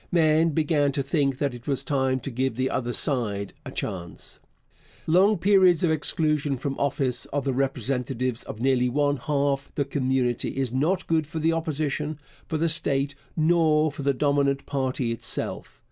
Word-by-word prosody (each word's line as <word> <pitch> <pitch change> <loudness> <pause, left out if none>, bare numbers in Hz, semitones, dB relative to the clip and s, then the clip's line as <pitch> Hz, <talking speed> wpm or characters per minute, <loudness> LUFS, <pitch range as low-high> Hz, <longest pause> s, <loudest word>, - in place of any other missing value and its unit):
Men 160 -1 +3
began 150 -2 +1
to 140 -1 -1
think 140 -2 0
that 140 -2 -1
it 120 -1 -11
was 140 -2 0
time 130 -2 0
to 135 - -4
give 130 0 -1
the 130 +2 -1
other 120 -1 -2
side 105 -7 0
a - - -7
chance. 85 -2 -6 0.7
Long 190 +6 +4
periods 185 -2 +4
of 170 - +3
exclusion 150 -2 0
from 135 +2 -3
office 135 -3 0
of 145 0 -3
the 135 - 0
representatives 130 -2 -2
of 110 - -8
nearly 125 0 +2
one 145 +2 +1
half 140 0 -1
the 140 - 0
community 130 -3 -1
is 130 -3 -1
not 170 +8 0
good 160 -2 0
for 160 - -7
the 160 +1 +2
Opposition, 155 -2 -2 0.3
for 160 - -2
the 165 +2 +1
state, 140 -3 +1 0.2
nor 155 -1 +3
for 145 - -8
the 140 0 +2
dominant 140 0 +1
party 130 -3 -1
itself. 115 - -1
140 Hz, 170 wpm, -25 LUFS, 130-155 Hz, 0.7 s, Long